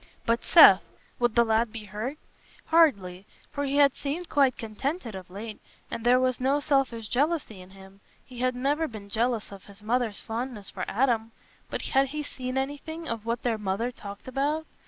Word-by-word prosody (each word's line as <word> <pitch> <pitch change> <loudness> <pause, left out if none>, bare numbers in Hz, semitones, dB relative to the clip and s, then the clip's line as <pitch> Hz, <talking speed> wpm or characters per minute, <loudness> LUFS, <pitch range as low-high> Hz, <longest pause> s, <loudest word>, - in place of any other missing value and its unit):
But 230 +1 +1
Seth? 200 - +8 0.4
Would 240 -2 +1
the 235 - +6
lad 225 0 +1
be 225 -1 -7
hurt? 215 +8 -5 0.5
Hardly; 200 - +2 0.2
for 285 0 -2
he 275 0 -1
had 285 -2 +5
seemed 320 +5 -4
quite 275 -4 +3
contented 235 - -4
of 185 -1 -9
late, 210 +3 -8 0.3
and 230 - -4
there 245 +1 +5
was 255 -1 +1
no 275 +3 +2
selfish 270 -7 0
jealousy 285 - -1
in 185 - -14
him; 195 +1 -16 0.2
he 250 -2 -11
had 255 0 +1
never 290 +5 0
been 215 -5 -10
jealous 230 0 -1
of 195 -1 -11
his 200 +1 -15
mother's 230 -1 0
fondness 225 -3 -5
for - - -4
Adam. 230 -2 0 0.4
But - - -4
had 270 +1 +2
he 300 +3 -4
seen 255 -2 -5
anything 290 +4 -4
of 230 -1 -4
what 235 +1 -2
their 230 -3 0
mother 210 +4 -1
talked 200 -3 -10
about? 290 +5 -1
240 Hz, 185 wpm, -27 LUFS, 215-275 Hz, 0.5 s, Seth